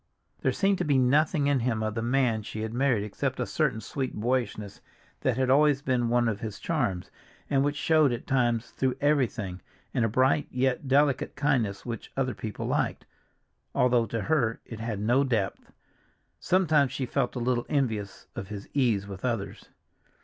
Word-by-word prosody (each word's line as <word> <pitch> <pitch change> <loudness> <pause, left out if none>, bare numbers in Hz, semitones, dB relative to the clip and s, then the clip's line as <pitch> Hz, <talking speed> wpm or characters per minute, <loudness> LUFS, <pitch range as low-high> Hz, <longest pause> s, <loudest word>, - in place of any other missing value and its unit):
There - - +1
seemed 195 -1 +1
to - - +1
be 145 -2 +2
nothing 145 +4 +3
in 140 -2 +2
him 115 -2 0
of 110 0 -1
the 115 - -2
man 120 -2 +1
she 110 +1 -6
had 110 0 -4
married 125 -4 +2
except 105 - -3
a - - 0
certain 110 - 0
sweet 130 +4 -4
boyishness 110 -3 -2 0.4
that 130 -3 0
had 130 -1 +2
always 145 0 +4
been 125 -3 +1
one 120 0 +3
of 105 -3 -1
his 110 -2 -5
charms, 120 - -2 0.4
and 135 -1 +3
which 145 +1 0
showed 155 -2 +3
at 120 0 -4
times 120 -3 +1
through 130 -1 0
everything, 120 -10 0 0.3
and 125 - +1
a 115 - +2
bright, 130 +6 +2
yet 130 +2 0
delicate 140 0 +2
kindness 130 -8 0
which 120 -2 -6
other 130 -2 0
people 110 -2 -5
liked, - - -1 0.7
although 125 -2 +3
to 115 +2 -3
her 120 -4 +1
it 115 - -8
had 110 -3 -3
no 120 +6 +3
depth. 115 -8 -2 0.7
Sometimes 155 -7 +3
she 135 -1 -2
felt 125 0 -1
a - - -2
little 120 0 0
envious 110 -9 -1
of 95 - -5
his 105 -1 -7
ease 115 -8 +2
with 100 -1 -8
others. 115 -5 -3
125 Hz, 180 wpm, -27 LUFS, 110-135 Hz, 0.7 s, always